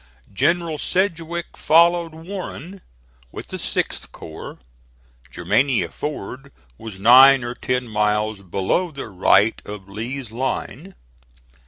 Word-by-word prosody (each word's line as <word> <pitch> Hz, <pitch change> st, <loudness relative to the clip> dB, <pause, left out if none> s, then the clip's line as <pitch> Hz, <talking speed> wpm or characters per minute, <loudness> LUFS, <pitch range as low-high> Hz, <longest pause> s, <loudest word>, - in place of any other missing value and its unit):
General 170 Hz, -, 0 dB
Sedgwick 170 Hz, -2 st, -2 dB
followed 170 Hz, 0 st, +3 dB
Warren 185 Hz, +1 st, -8 dB, 0.5 s
with -, -, -9 dB
the -, -, -5 dB
6th -, -, -2 dB
corps. 80 Hz, -, -10 dB, 0.7 s
Germania 135 Hz, -2 st, +1 dB
Ford 140 Hz, -1 st, -7 dB, 0.3 s
was 105 Hz, -4 st, -8 dB
nine 130 Hz, +5 st, +7 dB
or 120 Hz, 0 st, -4 dB
ten 125 Hz, 0 st, -2 dB
miles 105 Hz, -1 st, 0 dB
below 100 Hz, -, -1 dB
the 140 Hz, -7 st, -8 dB
right 100 Hz, +3 st, +3 dB
of 105 Hz, -2 st, -9 dB
Lee's 115 Hz, +4 st, -6 dB
line. 130 Hz, +4 st, -4 dB
130 Hz, 110 wpm, -21 LUFS, 105-165 Hz, 0.7 s, nine